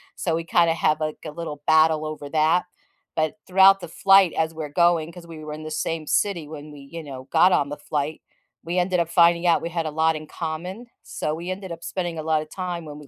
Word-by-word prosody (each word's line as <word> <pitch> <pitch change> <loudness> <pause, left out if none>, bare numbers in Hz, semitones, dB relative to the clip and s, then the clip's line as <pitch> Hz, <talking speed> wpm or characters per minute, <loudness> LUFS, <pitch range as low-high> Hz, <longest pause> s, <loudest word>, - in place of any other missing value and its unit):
So 165 -3 -1
we 165 - -2
kind 170 0 +3
of 165 - +1
have, 155 -1 +2
like, 155 -1 -3
a 155 - -5
little 150 -2 -7
battle 155 0 +4
over 155 -2 -6
that 160 +3 +2 0.5
but 155 -1 0
throughout 195 +1 +6
the 175 - -8
flight 195 +1 +5
as 160 0 0
we're 155 -2 -5
going- 170 0 +2
'cause 175 -1 -12
we 165 -2 -10
were 150 0 -6
in 155 - -8
the 155 - -7
same 155 0 -3
city 175 -5 0
when 150 0 -9
we, 145 -1 -12
you 165 -1 -7
know, 135 -3 -8
got 185 - +5
on 145 -5 +2
the 145 - -5
flight- 150 +1 -3 0.4
we 175 +2 -1
ended 180 0 +1
up 170 - +1
finding 170 +1 +4
out 170 - +4
we 170 - -4
had 165 -1 -2
a 155 - -3
lot 160 +1 +2
in 155 0 -10
common, 180 +8 -6 0.2
so 155 - -3
we 170 +3 -6
ended 185 -1 -5
up 165 0 -8
spending 175 -2 -3
a - - -4
lot 155 -1 +1
of 155 - -10
time 180 -3 -4
when 150 -1 -9
we 145 - -13
160 Hz, 250 wpm, -24 LUFS, 155-175 Hz, 0.5 s, throughout